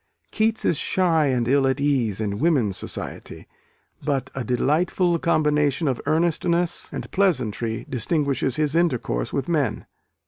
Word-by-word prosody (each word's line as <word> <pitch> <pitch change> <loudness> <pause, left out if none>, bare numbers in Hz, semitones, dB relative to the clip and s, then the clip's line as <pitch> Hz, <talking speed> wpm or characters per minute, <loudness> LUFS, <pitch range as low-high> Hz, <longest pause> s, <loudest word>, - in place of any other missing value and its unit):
Keats 220 0 0
is 165 - +2
shy 165 -5 +2
and 125 -3 0
ill 135 +1 +3
at 130 +1 0
ease 130 -8 +1
in 105 -2 -2
women's 130 - +2
society: - - -7 0.6
but 135 -3 -1
a 135 - -3
"delightful 165 +7 +1
combination 150 -2 +1
of 130 -3 -1
earnestness 170 +1 0
and - - -6
pleasantry 120 - 0
distinguishes 135 +1 -1
his 150 0 0
intercourse 125 - 0
with - - -2
men." - - 0
145 Hz, 135 wpm, -23 LUFS, 125-170 Hz, 0.6 s, ill